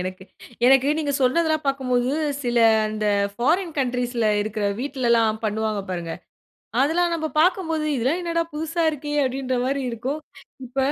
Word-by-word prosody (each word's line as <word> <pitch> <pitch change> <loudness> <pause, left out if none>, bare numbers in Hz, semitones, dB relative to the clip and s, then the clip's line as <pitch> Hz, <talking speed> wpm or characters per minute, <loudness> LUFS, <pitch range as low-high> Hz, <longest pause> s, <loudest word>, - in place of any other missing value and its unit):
எனக்கு 185 +1 -5 0.4
எனக்கு 270 +1 +5
நீங்க 290 -2 -1
சொன்னதெல்லாம் 310 +3 +2
பார்க்கும்போது, 255 -1 0 0.3
சில 240 -1 -1 0.3
அந்த 215 0 -2 0.3
ஃபாரின் 325 - 0
கன்ட்ரீஸ்ல 245 -3 0
இருக்கற 215 -1 -2
வீட்டில 260 -3 -1
எல்லாம் 225 -1 +2
பண்ணுவாங்க 215 -1 -1
பாருங்க! 170 -2 -4 0.7
அதெல்லாம் 340 +4 +2
நம்ப 315 -1 -1
பார்க்கும்போது, 330 -3 +1
"இதெல்லாம் 265 +9 0
என்னடா 335 -1 0
புதுசா 320 +2 -2
இருக்கே!" 295 -1 -5
அப்படின்ற 260 0 -2
மாறி 275 +1 -1
இருக்கும். 260 +7 -3 0.5
இப்ப 250 +3 -14
265 Hz, 135 wpm, -23 LUFS, 230-310 Hz, 0.7 s, எனக்கு